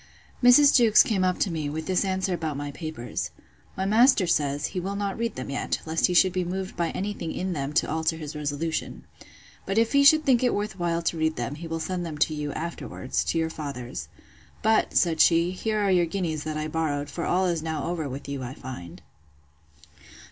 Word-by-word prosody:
Mrs. 280 Hz, +4 st, +7 dB
Jewkes 230 Hz, -4 st, +7 dB
came 195 Hz, -4 st, 0 dB
up 185 Hz, -1 st, +1 dB
to 190 Hz, -, +1 dB
me, 155 Hz, -3 st, -3 dB
with 155 Hz, +2 st, -4 dB
this 185 Hz, +1 st, +1 dB
answer 190 Hz, -1 st, -1 dB
about 160 Hz, -4 st, -3 dB
my 145 Hz, 0 st, -4 dB
papers: 155 Hz, -6 st, -5 dB, 0.5 s
My 190 Hz, -, -1 dB
master 225 Hz, +1 st, +5 dB
says, 145 Hz, -4 st, 0 dB
he 185 Hz, -, -1 dB
will 195 Hz, +3 st, -3 dB
not 200 Hz, -1 st, -2 dB
read 230 Hz, 0 st, -2 dB
them 130 Hz, +2 st, -5 dB
yet, 140 Hz, -, -2 dB
lest 160 Hz, +1 st, +2 dB
he 180 Hz, -, -2 dB
should 185 Hz, +1 st, +5 dB
be 185 Hz, -, 0 dB
moved 185 Hz, +2 st, -4 dB
by 170 Hz, -1 st, 0 dB
any 205 Hz, +2 st, -3 dB
thing 165 Hz, -5 st, -5 dB
in 185 Hz, 0 st, -3 dB
them 140 Hz, -2 st, -3 dB
to 155 Hz, -, +2 dB
alter 160 Hz, +1 st, -1 dB
his 155 Hz, -2 st, -7 dB
resolution. 150 Hz, +2 st, -3 dB, 0.6 s
But 195 Hz, -, -3 dB
if 230 Hz, +2 st, +2 dB
he 280 Hz, 0 st, +5 dB
should 310 Hz, +2 st, +6 dB
think 255 Hz, -3 st, +4 dB
it 250 Hz, -, +2 dB
worth 205 Hz, -1 st, -3 dB
while 170 Hz, -1 st, 0 dB
to 165 Hz, -, -1 dB
read 160 Hz, 0 st, +1 dB
them, 120 Hz, +3 st, -3 dB
he 160 Hz, +3 st, -7 dB
will 165 Hz, 0 st, -3 dB
send 180 Hz, +1 st, -3 dB
them 160 Hz, -3 st, -5 dB
to 155 Hz, -, +2 dB
you, 150 Hz, -1 st, -3 dB
afterwards, 165 Hz, -5 st, -3 dB
to -, -, -1 dB
your 160 Hz, 0 st, 0 dB
father's. 140 Hz, -6 st, -6 dB, 0.6 s
But, 220 Hz, +1 st, +2 dB
said 165 Hz, -3 st, +3 dB
she, 170 Hz, +1 st, +4 dB
here 215 Hz, +3 st, -2 dB
are 200 Hz, -2 st, +2 dB
your 175 Hz, -2 st, +3 dB
guineas 165 Hz, -4 st, -3 dB
that 155 Hz, -1 st, -3 dB
I 155 Hz, 0 st, -2 dB
borrowed: 150 Hz, -2 st, -2 dB
for 170 Hz, -, -4 dB
all 185 Hz, +1 st, +1 dB
is 170 Hz, -3 st, 0 dB
over 160 Hz, +1 st, -2 dB
now -, -, -4 dB
with 135 Hz, +2 st, -7 dB
you, 140 Hz, -1 st, -4 dB
I 130 Hz, +1 st, -6 dB
find. 105 Hz, -10 st, -9 dB
170 Hz, 220 wpm, -26 LUFS, 150-190 Hz, 0.6 s, Mrs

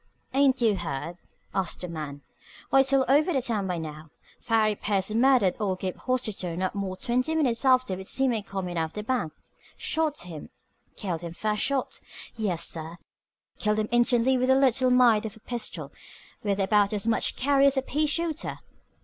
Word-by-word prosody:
"Ain't 270 Hz, -1 st, +3 dB
you 220 Hz, -3 st, +3 dB
heerd?" 165 Hz, 0 st, -4 dB, 0.4 s
asked 190 Hz, -2 st, -2 dB
the 180 Hz, -, -4 dB
man. 150 Hz, -4 st, -6 dB, 0.5 s
"Why, 270 Hz, -, +6 dB
it's 270 Hz, 0 st, +3 dB
all 270 Hz, -1 st, +4 dB
over 295 Hz, +2 st, +3 dB
town 225 Hz, -6 st, -2 dB
by 180 Hz, -2 st, -2 dB
now. 155 Hz, -1 st, -7 dB, 0.3 s
Farry 220 Hz, -2 st, +2 dB
Pierce 205 Hz, 0 st, -1 dB
murdered 235 Hz, -4 st, +4 dB
old 190 Hz, -3 st, -1 dB
Gabe 185 Hz, -1 st, -3 dB
Hostetter 215 Hz, -9 st, -2 dB
not 185 Hz, +1 st, -1 dB
more'n 195 Hz, -2 st, -4 dB
twenty 255 Hz, +8 st, 0 dB
minutes 255 Hz, -7 st, +1 dB
after 255 Hz, -5 st, +4 dB
we 190 Hz, +1 st, -8 dB
seen 265 Hz, +4 st, +1 dB
him 220 Hz, -, -1 dB
comin' 185 Hz, -4 st, -4 dB
out 160 Hz, -, +1 dB
of 160 Hz, -, -10 dB
the 210 Hz, -, -5 dB
bank. 225 Hz, -9 st, -1 dB, 0.5 s
Shot 315 Hz, -2 st, -1 dB
him. 165 Hz, -4 st, -9 dB, 0.5 s
Killed 175 Hz, -6 st, -4 dB
him 170 Hz, -1 st, -6 dB
first 210 Hz, +3 st, -1 dB
shot. 275 Hz, -2 st, -1 dB, 0.3 s
Yes, 200 Hz, -7 st, -1 dB
sir! 165 Hz, +1 st, -4 dB, 0.6 s
Killed 210 Hz, 0 st, +1 dB
him 215 Hz, 0 st, -1 dB
instantly 240 Hz, +1 st, +3 dB
with 255 Hz, +1 st, +1 dB
a 265 Hz, -, +6 dB
little 260 Hz, -1 st, +3 dB
mite 240 Hz, -4 st, +4 dB
of 220 Hz, +1 st, -11 dB
a -, -, -17 dB
pistol 240 Hz, +1 st, -4 dB, 0.5 s
with 200 Hz, -1 st, -1 dB
about 200 Hz, +1 st, +3 dB
as 205 Hz, -1 st, -1 dB
much 230 Hz, -1 st, +1 dB
carry 275 Hz, +1 st, +3 dB
as 275 Hz, 0 st, +2 dB
a 265 Hz, -, +1 dB
pea 305 Hz, +3 st, 0 dB
shooter. 325 Hz, +1 st, -2 dB
215 Hz, 185 wpm, -27 LUFS, 185-260 Hz, 0.6 s, Why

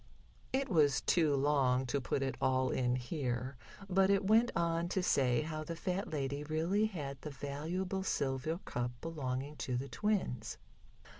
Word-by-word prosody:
It 270 Hz, +1 st, +1 dB
was 150 Hz, -, +3 dB
too 155 Hz, -5 st, +3 dB
long 135 Hz, -2 st, +2 dB
to 135 Hz, +3 st, -1 dB
put 135 Hz, +2 st, -1 dB
it 135 Hz, -, -1 dB
all 130 Hz, -1 st, +2 dB
in 125 Hz, -1 st, +1 dB
here, 125 Hz, 0 st, -2 dB, 0.3 s
but 190 Hz, 0 st, +3 dB
it 200 Hz, 0 st, +3 dB
went 225 Hz, +4 st, +5 dB
on 170 Hz, 0 st, +1 dB
to 185 Hz, 0 st, 0 dB
say 125 Hz, -5 st, +3 dB
how 155 Hz, 0 st, -4 dB
the 165 Hz, +2 st, -5 dB
fat 185 Hz, +3 st, -2 dB
lady 140 Hz, -1 st, -2 dB
really 165 Hz, +8 st, +1 dB
had 140 Hz, -9 st, -6 dB
the 150 Hz, -, -5 dB
valuable 160 Hz, +7 st, -3 dB
silver 140 Hz, -2 st, -1 dB
cup 125 Hz, 0 st, -2 dB
belonging 140 Hz, -2 st, -4 dB
to 125 Hz, -2 st, -2 dB
the 135 Hz, +2 st, -4 dB
twins. 210 Hz, -, -1 dB
150 Hz, 160 wpm, -34 LUFS, 130-180 Hz, 0.3 s, went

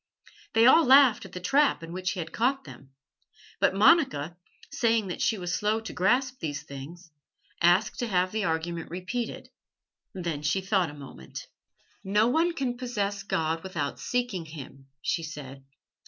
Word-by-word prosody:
They 225 Hz, +1 st, +5 dB
all 320 Hz, +6 st, +7 dB
laughed 260 Hz, -5 st, +6 dB
at 195 Hz, -, -11 dB
the 180 Hz, -, -5 dB
trap 270 Hz, -, +2 dB
in 165 Hz, -, -8 dB
which 185 Hz, 0 st, -2 dB
he 185 Hz, -, -6 dB
had 165 Hz, -1 st, -5 dB
caught 270 Hz, +4 st, +1 dB
them. 135 Hz, -, -13 dB, 0.7 s
But -, -, +2 dB
Monica, 200 Hz, -, +4 dB, 0.4 s
saying 225 Hz, -4 st, +1 dB
that 180 Hz, -, -5 dB
she 220 Hz, -, +1 dB
was 175 Hz, -2 st, -4 dB
slow 210 Hz, +3 st, +1 dB
to 225 Hz, -, -8 dB
grasp 250 Hz, +7 st, +1 dB
these 145 Hz, -3 st, -4 dB
things, 160 Hz, +5 st, -10 dB, 0.5 s
asked 175 Hz, +5 st, +3 dB
to 240 Hz, -, -1 dB
have 185 Hz, -3 st, +1 dB
the 220 Hz, -1 st, -1 dB
argument 165 Hz, +1 st, -2 dB
repeated. 185 Hz, +7 st, -5 dB, 0.7 s
Then 170 Hz, -5 st, -3 dB
she 150 Hz, +6 st, +1 dB
thought 190 Hz, -3 st, +1 dB
a 145 Hz, -, -10 dB
moment. 135 Hz, -, -10 dB, 0.6 s
"No 210 Hz, +3 st, +2 dB
one 330 Hz, +6 st, +2 dB
can 260 Hz, -6 st, -2 dB
possess 205 Hz, -5 st, -2 dB
God 160 Hz, -4 st, -1 dB
without 165 Hz, -6 st, -4 dB
seeking 245 Hz, -9 st, -2 dB
Him," 135 Hz, -3 st, -11 dB, 0.2 s
she 170 Hz, -, 0 dB
said. 140 Hz, -4 st, -8 dB
185 Hz, 165 wpm, -27 LUFS, 165-235 Hz, 0.7 s, all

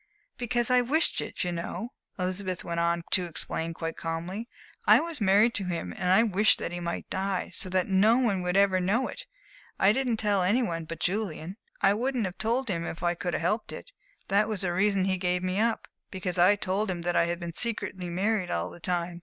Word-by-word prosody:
"Because 240 Hz, 0 st, 0 dB
I 250 Hz, 0 st, +6 dB
wished 300 Hz, +7 st, +2 dB
it, -, -, -3 dB
you 180 Hz, -, -1 dB
know," 175 Hz, +6 st, -4 dB, 0.3 s
Elizabeth 185 Hz, 0 st, -2 dB
went 170 Hz, 0 st, -3 dB
on 170 Hz, 0 st, +1 dB
to 185 Hz, -, +4 dB
explain 165 Hz, 0 st, -2 dB
quite 165 Hz, -1 st, -4 dB
calmly. 175 Hz, +8 st, -4 dB, 0.4 s
"I -, -, +8 dB
was 330 Hz, -6 st, -4 dB
married 205 Hz, +4 st, +4 dB
to 200 Hz, -, -2 dB
him, 170 Hz, -, -3 dB
and 180 Hz, -, 0 dB
I 195 Hz, +5 st, +6 dB
wished 210 Hz, -1 st, +3 dB
that -, -, -4 dB
he 175 Hz, -, -4 dB
might 170 Hz, -1 st, -4 dB
die, 190 Hz, 0 st, -2 dB
so 185 Hz, -, -2 dB
that 185 Hz, 0 st, +1 dB
no 205 Hz, +5 st, +4 dB
one 215 Hz, -8 st, +1 dB
would 180 Hz, +1 st, 0 dB
ever 195 Hz, -2 st, +4 dB
know 205 Hz, +8 st, +1 dB
it, -, -, -8 dB, 0.5 s
I 195 Hz, +2 st, +5 dB
didn't 250 Hz, -2 st, 0 dB
tell 205 Hz, -3 st, +1 dB
any 210 Hz, +8 st, +2 dB
one 165 Hz, -6 st, -3 dB
but 165 Hz, +1 st, -7 dB
Julian 185 Hz, -3 st, -2 dB, 0.3 s
I 195 Hz, -, +6 dB
wouldn't 245 Hz, +1 st, -1 dB
have 185 Hz, -1 st, -6 dB
told 240 Hz, +4 st, 0 dB
him 170 Hz, -5 st, -2 dB
if 165 Hz, +1 st, -6 dB
I 175 Hz, 0 st, +2 dB
could 175 Hz, 0 st, -3 dB
have -, -, -2 dB
helped 210 Hz, +6 st, -1 dB
it. -, -, -9 dB, 0.4 s
That 205 Hz, +2 st, +3 dB
was 215 Hz, -4 st, -3 dB
the 180 Hz, -2 st, 0 dB
reason 195 Hz, +1 st, +2 dB
he 190 Hz, -1 st, +1 dB
gave 180 Hz, 0 st, 0 dB
me 185 Hz, +2 st, -1 dB
up 230 Hz, +1 st, 0 dB, 0.2 s
because 185 Hz, -2 st, -3 dB
I 185 Hz, +4 st, +6 dB
told 200 Hz, +1 st, -1 dB
him 175 Hz, -2 st, -3 dB
that 175 Hz, 0 st, -1 dB
I -, -, +4 dB
had 170 Hz, 0 st, -2 dB
been 170 Hz, -2 st, -6 dB
secretly 195 Hz, -4 st, -3 dB
married 190 Hz, +2 st, 0 dB
all 85 Hz, +2 st, -2 dB
the -, -, -12 dB
time. 175 Hz, 0 st, -2 dB
185 Hz, 225 wpm, -28 LUFS, 175-215 Hz, 0.5 s, I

